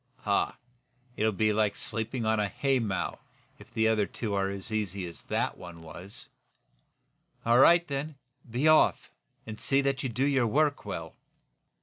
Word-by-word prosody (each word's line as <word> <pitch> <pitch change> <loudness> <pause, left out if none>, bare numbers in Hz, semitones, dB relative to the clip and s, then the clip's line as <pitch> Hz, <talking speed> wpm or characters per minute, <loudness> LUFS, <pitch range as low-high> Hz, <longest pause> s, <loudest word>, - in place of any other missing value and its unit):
"Huh! - - 0 0.6
It'll 110 +1 +2
be 110 +1 +1
like 105 -1 +1
sleeping 115 +1 -3
on 110 0 +2
a 105 - +1
haymow, 120 -9 -1 0.4
if - - -15
the 110 0 +2
other 110 -2 +2
two 110 -4 -4
are 95 -1 +1
as 100 +4 -5
easy 100 -3 -2
as 85 -1 -8
that - - -1
one 85 -2 -10
was." 90 +5 -8 1.2
"All 120 +1 +5
right, 170 +5 +6
then! 145 +2 -3 0.3
Be 125 +7 +1
off, 155 0 +4 0.3
and 110 -1 -7
see 135 - +2
that 135 -1 0
you 130 - -2
do 125 +4 0
your 135 -4 +2
work 145 +5 +1
well!" - - -5
110 Hz, 160 wpm, -29 LUFS, 100-135 Hz, 1.2 s, right